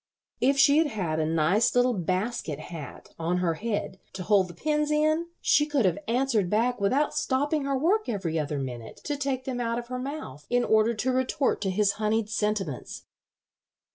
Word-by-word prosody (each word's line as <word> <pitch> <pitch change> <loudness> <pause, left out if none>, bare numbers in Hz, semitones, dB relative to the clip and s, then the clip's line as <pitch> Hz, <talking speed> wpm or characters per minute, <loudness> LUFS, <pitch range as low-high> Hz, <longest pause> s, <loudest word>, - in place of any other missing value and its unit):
If 270 +3 +3
she 280 +2 +6
had 320 - +3
had 180 - -2
a 155 - +1
nice 165 +9 +2
little 245 0 +4
basket 185 -3 -2
hat 155 -3 -9
on 170 +2 0
her 180 -2 +1
head 205 0 -3
to 190 -1 -5
hold 195 -1 +3
the 175 - -11
pins 300 - 0
in 310 +2 +2
she 295 - +3
could 285 -7 +1
have 185 +1 +1
answered 230 -5 +1
back 235 +3 +1
without 270 +9 +2
stopping 285 +2 0
her 275 -1 0
work 390 +10 +1
every 175 -7 -1
other 150 -1 -2
minute 125 -4 -6
to 295 - -2
take 275 -2 -2
them 255 -2 -3
out 230 0 -1
of 240 0 -6
her 250 0 -3
mouth 255 - -7
in 245 0 +2
order 220 +1 +3
to 250 +5 0
retort 260 0 0
to 195 - 0
his 200 +1 +2
honeyed 215 0 0
sentiments." 210 - -2
225 Hz, 190 wpm, -27 LUFS, 180-270 Hz, -, she